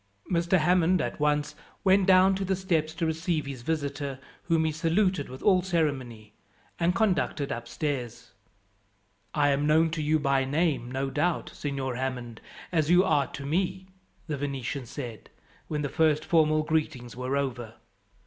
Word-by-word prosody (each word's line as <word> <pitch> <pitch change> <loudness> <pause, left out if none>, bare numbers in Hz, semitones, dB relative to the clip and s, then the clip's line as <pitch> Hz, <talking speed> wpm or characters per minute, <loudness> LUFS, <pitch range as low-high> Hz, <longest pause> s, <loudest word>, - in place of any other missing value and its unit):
Mr. 170 +1 +3
Hammond 180 +2 +3
at - - -3
once 150 0 +1 0.3
went 190 -1 +4
down 190 0 +6
to 195 +1 -2
the 190 0 0
steps 165 -4 -1
to 165 - -1
receive 160 0 -1
his 135 -3 -6
visitor, 145 -1 -3 0.3
whom 165 -2 +2
he 160 - +1
saluted 165 +1 +1
with 130 +1 -9
all 185 -3 +5
ceremony, 135 - -2 0.5
and 175 +1 +2
conducted 175 -9 0
upstairs. 120 -1 -4 1.0
"I 145 -1 +3
am 140 +1 +1
known 160 +1 +4
to 160 -1 -2
you 155 +1 +2
by 140 -2 +1
name, 140 -3 0
no 135 +1 -2
doubt, 160 +5 -1
Signor 135 -3 -3
Hammond, 125 -3 -4 0.3
as 160 -3 +1
you 180 +1 +6
are 145 -7 +2
to 140 - -8
me," 185 +4 -1 0.4
the 150 -3 -3
Venetian 135 -2 -4
said, 120 -5 -7 0.4
when 150 -1 -2
the - - 0
first 155 +1 +2
formal 155 -3 +3
greetings 150 -7 -2
were 130 +2 -2
over. 120 -5 -3
150 Hz, 160 wpm, -27 LUFS, 135-170 Hz, 1.0 s, down